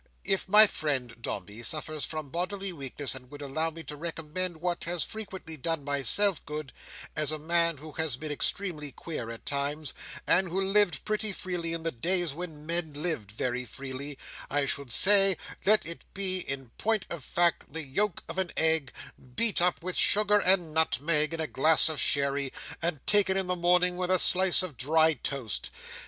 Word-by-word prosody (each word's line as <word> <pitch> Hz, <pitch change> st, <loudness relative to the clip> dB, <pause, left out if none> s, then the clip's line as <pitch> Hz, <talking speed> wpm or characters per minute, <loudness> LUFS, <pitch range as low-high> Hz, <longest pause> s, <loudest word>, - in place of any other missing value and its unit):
If 195 Hz, -1 st, -1 dB
my 210 Hz, +2 st, +8 dB
friend 140 Hz, -, -3 dB
Dombey 100 Hz, +1 st, -5 dB
suffers 155 Hz, +3 st, -1 dB
from 155 Hz, -3 st, -6 dB
bodily 190 Hz, +2 st, -3 dB
weakness, 140 Hz, -2 st, -4 dB
and 125 Hz, -1 st, -9 dB
would 145 Hz, 0 st, -9 dB
allow 155 Hz, +4 st, 0 dB
me 165 Hz, 0 st, -10 dB
to 150 Hz, -, -7 dB
recommend 165 Hz, +2 st, -4 dB
what 175 Hz, +1 st, -3 dB
has 170 Hz, -1 st, +2 dB
frequently 190 Hz, -7 st, -7 dB
done 165 Hz, +1 st, -3 dB
myself 145 Hz, +7 st, 0 dB
good, 150 Hz, -2 st, -6 dB, 0.4 s
as 155 Hz, 0 st, +2 dB
a 155 Hz, -, -2 dB
man 170 Hz, +1 st, +2 dB
who 155 Hz, +3 st, -9 dB
has 155 Hz, -5 st, -1 dB
been 155 Hz, +2 st, -5 dB
extremely 150 Hz, -1 st, -1 dB
queer 140 Hz, -5 st, -6 dB
at 115 Hz, 0 st, -8 dB
times, 145 Hz, +1 st, -2 dB, 0.3 s
and 185 Hz, 0 st, +3 dB
who 185 Hz, +3 st, -2 dB
lived 195 Hz, -1 st, +2 dB
pretty 215 Hz, 0 st, 0 dB
freely 175 Hz, -3 st, -3 dB
in 165 Hz, -1 st, -3 dB
the 165 Hz, -, -1 dB
days 175 Hz, +5 st, 0 dB
when 155 Hz, -2 st, -7 dB
men 165 Hz, -2 st, -1 dB
lived 150 Hz, -, -2 dB
very 125 Hz, +4 st, -3 dB
freely, 135 Hz, +3 st, -7 dB, 0.3 s
I 145 Hz, -1 st, +1 dB
should 140 Hz, -2 st, -2 dB
say, 195 Hz, -, +7 dB, 0.3 s
let 215 Hz, +1 st, +4 dB
it 170 Hz, 0 st, -7 dB
be 190 Hz, -2 st, +2 dB
in 135 Hz, -7 st, -4 dB
point 220 Hz, -2 st, 0 dB
of 170 Hz, -5 st, -6 dB
fact 170 Hz, +4 st, 0 dB
the 160 Hz, +2 st, -3 dB
yolk 185 Hz, +8 st, -1 dB
of -, -, -4 dB
an 185 Hz, -2 st, -1 dB
egg, 160 Hz, -4 st, +1 dB, 0.4 s
beat 220 Hz, -, +3 dB
up 175 Hz, -1 st, +1 dB
with 185 Hz, 0 st, -2 dB
sugar 210 Hz, 0 st, +5 dB
and 180 Hz, -5 st, +3 dB
nutmeg, 155 Hz, 0 st, +2 dB
in 165 Hz, -, -4 dB
a 160 Hz, -, -1 dB
glass 155 Hz, +3 st, +3 dB
of 155 Hz, -, -3 dB
sherry, 140 Hz, -1 st, +1 dB, 0.3 s
and 165 Hz, -5 st, -3 dB
taken 195 Hz, -2 st, +2 dB
in 190 Hz, -, 0 dB
the 180 Hz, 0 st, -1 dB
morning 180 Hz, +1 st, +2 dB
with 180 Hz, 0 st, -3 dB
a 185 Hz, -, +4 dB
slice 185 Hz, 0 st, +6 dB
of 160 Hz, -8 st, -6 dB
dry 160 Hz, +6 st, +3 dB
toast. 130 Hz, -4 st, -5 dB
160 Hz, 185 wpm, -28 LUFS, 145-180 Hz, 0.4 s, my